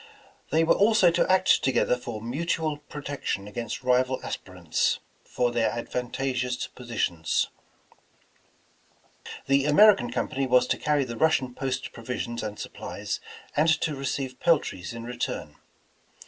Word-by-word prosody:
They 160 +2 +3
were 165 - +5
also 205 -4 +5
to 170 +2 +2
act 185 0 +4
together 130 -1 +2
for 120 -3 -7
mutual 155 +4 -1
protection 145 -8 -5
against 115 +4 -5
rival 130 +1 +2
as - - -2
pirants 90 -4 -1 0.3
for 125 -1 0
their 120 -1 +2
advantageous 125 +1 -2
positions. 110 -9 -1 2.0
The 135 0 +3
American 150 - +6
Company 130 +2 -1
was 125 0 +5
to - - +1
carry 150 -2 +2
the 120 -3 -6
Russian 135 -5 +2
post 130 -1 -3
provisions 120 0 -4
and 105 0 -5
supplies - - -5 0.4
and 155 +3 +4
to 155 -2 0
receive 135 -1 -3
pel 170 -2 +5
tries 90 -10 -7
in 115 0 -7
return. 120 -11 -4
125 Hz, 135 wpm, -26 LUFS, 120-150 Hz, 2.0 s, American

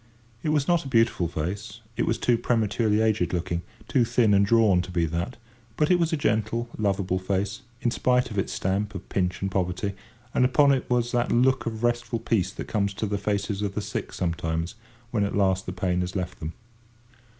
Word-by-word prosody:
It 155 - -1
was 150 -2 +2
not 175 -2 +3
a - - -7
beautiful 115 -8 +2
face; 100 +8 -4
it 115 - 0
was - - +1
too 120 - +2
prematurely 110 -2 +1
aged 105 -6 +1
looking, 85 0 -1 0.3
too 130 - +3
thin 115 -2 +3
and 100 0 +5
drawn, 105 -3 +4
to 90 - -8
be 85 -2 +1
that; 85 +10 -3 0.4
but 150 +3 +3
it 180 - +5
was 165 0 +1
a 160 - +1
gentle, 110 -1 0
lovable 95 -3 0
face, 100 +5 -2 0.2
in 120 - +1
spite 125 0 +2
of 100 - -1
its - - -1
stamp 100 +2 -1
of 95 - -7
pinch 90 0 -1
and 95 - -1
poverty, 95 +2 -1 0.4
and - - +3
upon 140 +3 +5
it 135 -2 0
was 120 -1 +1
that 120 0 +1
look 130 +1 +3
of 110 0 -4
restful 120 0 0
peace 105 -5 0
that - - -6
comes 100 -2 0
to 110 - -2
the 100 -1 -1
faces 100 -1 -1
of 100 -1 -2
the - - 0
sick 105 +1 -4
sometimes 85 -1 -2 0.4
when 110 -5 +1
at 100 - -1
last 95 -2 +2
the - - -2
pain 90 -1 0
has 90 +1 -4
left 90 -1 -3
them. 80 +2 -5
105 Hz, 210 wpm, -26 LUFS, 95-120 Hz, 0.4 s, and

